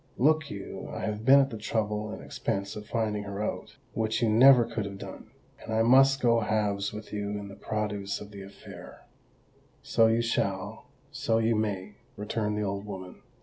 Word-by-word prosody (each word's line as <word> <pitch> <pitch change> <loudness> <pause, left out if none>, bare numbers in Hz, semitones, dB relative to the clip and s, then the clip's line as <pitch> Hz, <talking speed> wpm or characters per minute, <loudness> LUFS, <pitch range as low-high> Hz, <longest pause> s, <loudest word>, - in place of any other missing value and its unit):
Look 155 +2 +3
you—I 100 -1 -7
have 105 0 -3
been 135 +2 +8
at 135 - -1
the 110 - -6
trouble 105 -1 -2
and - - -7
expense 100 +2 -3
of 105 0 -8
finding 110 -3 -1
her 100 0 -5
out—which 110 +2 -3
you 115 - +3
never 125 +2 +7
could 115 -1 -3
have 100 -1 -6
done—and 110 - -11
I 110 0 +2
must 135 +3 +5
go 115 -1 +4
halves 105 -2 0
with 105 0 -9
you 105 -1 -2
in 100 -1 -7
the 100 - -10
produce 105 -2 -3
of 105 0 -10
the 100 -1 -9
affair." 100 +1 -12 0.8
"So 115 -1 +4
you 115 +1 +2
shall—so 105 +1 -2
you 115 0 +2
may," 105 -2 -2 0.2
returned 105 0 -2
the 105 - -1
old 100 0 -3
woman. 95 -3 -8
105 Hz, 175 wpm, -28 LUFS, 100-115 Hz, 0.8 s, been